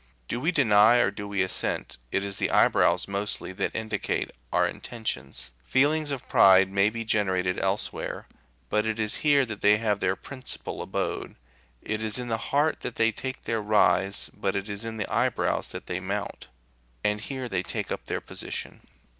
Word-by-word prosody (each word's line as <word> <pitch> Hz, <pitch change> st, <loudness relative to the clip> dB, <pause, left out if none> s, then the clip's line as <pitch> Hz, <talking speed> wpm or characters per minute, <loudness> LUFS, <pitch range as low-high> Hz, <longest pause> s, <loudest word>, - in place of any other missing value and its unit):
Do 120 Hz, -, -2 dB
we 160 Hz, +7 st, +1 dB
deny 115 Hz, -, +5 dB
or 120 Hz, -5 st, +3 dB
do 100 Hz, 0 st, -7 dB
we 100 Hz, -1 st, +1 dB
assent, 95 Hz, -, -3 dB
it 95 Hz, -, +1 dB
is 100 Hz, -1 st, -4 dB
the -, -, 0 dB
eyebrows, -, -, +4 dB
mostly, 100 Hz, -1 st, -3 dB
that -, -, -2 dB
indicate 110 Hz, -2 st, -2 dB, 0.2 s
our -, -, +3 dB
intentions. 70 Hz, -, -5 dB
Feelings 145 Hz, -, +2 dB
of 140 Hz, -3 st, -4 dB
pride 95 Hz, 0 st, +6 dB
may 100 Hz, +1 st, +3 dB
be 115 Hz, +1 st, -5 dB
generated 95 Hz, -4 st, +1 dB
elsewhere, 95 Hz, +1 st, -2 dB, 0.4 s
but 105 Hz, -, +2 dB
it 110 Hz, 0 st, -1 dB
is 110 Hz, -1 st, +3 dB
here 145 Hz, -3 st, +4 dB
that 110 Hz, -3 st, -6 dB
they 105 Hz, +1 st, +6 dB
have 105 Hz, -2 st, 0 dB
their 95 Hz, 0 st, +1 dB
principal 130 Hz, +5 st, -6 dB
abode; -, -, -3 dB, 0.5 s
it 110 Hz, 0 st, -2 dB
is 110 Hz, +1 st, 0 dB
in 125 Hz, -1 st, -4 dB
the 115 Hz, -, +1 dB
heart 145 Hz, +3 st, +2 dB
that 120 Hz, -, -5 dB
they 115 Hz, 0 st, +3 dB
take 130 Hz, +4 st, -6 dB
their 115 Hz, -1 st, -1 dB
rise, 105 Hz, -1 st, +2 dB
but 95 Hz, -1 st, -2 dB
it 100 Hz, +1 st, -2 dB
is 100 Hz, -1 st, -4 dB
to 115 Hz, 0 st, -3 dB
the 110 Hz, -3 st, -4 dB
eyebrows -, -, +1 dB
that -, -, -7 dB
they 90 Hz, -, -3 dB
mount, 100 Hz, +2 st, -4 dB, 0.6 s
and 105 Hz, 0 st, +1 dB
here 130 Hz, +1 st, -4 dB
they -, -, -1 dB
take -, -, -4 dB
up -, -, -4 dB
their -, -, -2 dB
position. -, -, -6 dB
105 Hz, 185 wpm, -27 LUFS, 100-120 Hz, 0.6 s, pride